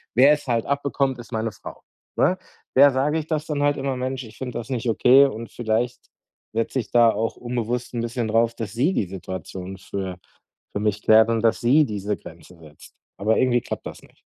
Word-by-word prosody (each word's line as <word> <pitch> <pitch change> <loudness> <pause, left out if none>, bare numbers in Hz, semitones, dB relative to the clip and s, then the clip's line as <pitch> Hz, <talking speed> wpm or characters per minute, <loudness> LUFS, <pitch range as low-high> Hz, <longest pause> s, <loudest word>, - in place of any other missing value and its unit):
Wer 135 +4 +7
es 145 -2 -4
halt 115 -2 0
abbekommt, 140 -2 0
ist 120 - -11
meine 110 0 -1
Frau, - - -11 0.4
ne? 185 - +3 0.4
Der 140 +2 +8
sage 145 +4 +1
ich 155 - -7
das 155 -2 -2
dann 145 -2 -1
halt 145 0 +2
immer: 135 -1 -2
„Mensch, 130 +1 -3
ich 110 - -14
finde 125 -2 -5
das 115 - -8
nicht 125 -2 -2
okay.“ 130 +5 +6
Und 115 -4 -5
vielleicht 120 +1 -2 0.5
setze 115 +4 -1
ich 120 - -6
da 120 -1 +6
auch 110 +2 -2
unbewusst 120 0 -3
'n 115 - -2
bisschen 120 -1 -2
drauf, 115 +1 +2
dass 110 -2 -5
sie 135 +10 +2
die 100 - 0
Situation 95 0 -7
für 95 -1 -5 0.6
für - - -2
mich 105 -1 -1
klärt 110 +1 +6
und 115 -1 +1
dass 115 0 +3
sie 140 +6 +5
diese 105 -3 -3
Grenzen 85 +2 -14
setzt. 75 -1 -15 0.2
Aber 110 +2 +1
irgendwie 125 -1 +3
klappt - - -6
das - - -10
nicht. - - -22
120 Hz, 210 wpm, -23 LUFS, 110-130 Hz, 0.6 s, Der